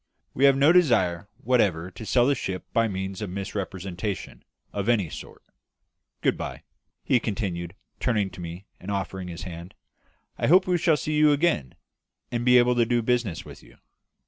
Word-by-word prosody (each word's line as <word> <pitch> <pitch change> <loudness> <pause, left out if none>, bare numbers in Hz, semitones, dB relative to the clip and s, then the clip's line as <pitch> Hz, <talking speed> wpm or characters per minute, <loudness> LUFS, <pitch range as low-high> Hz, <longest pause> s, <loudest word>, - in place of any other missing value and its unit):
We 135 - +3
have 140 -1 +6
no 140 +3 +6
desire 100 - +3 0.2
whatever 100 -8 +1
to 110 - -9
sell 120 -1 +4
the 140 - +3
ship 95 -8 -4
by 115 0 +3
means 95 0 -4
of 105 - -3
misrepresentation 95 0 -5 0.3
of 100 +2 -2
any 105 -9 +2
sort. - - -10 0.8
Good - - +2
bye," - - -6 0.4
he 125 - +3
continued, 95 -6 -3 0.2
turning 105 -6 0
to - - -10
me, 85 +3 -7
and 95 - -9
offering 95 -2 -3
his 90 +1 -7
hand; 85 0 -8 0.6
"I - - +1
hope 185 +4 +6
we 180 -1 +1
shall 160 -2 +3
see 155 - -3
you 150 0 +5
again, 145 - +1 0.6
and 120 0 -1
be 125 0 +6
able 125 0 +5
to 120 - +4
do 120 -1 +1
business 120 -8 0
with - - -12
you." - - -19
105 Hz, 175 wpm, -26 LUFS, 95-125 Hz, 0.8 s, have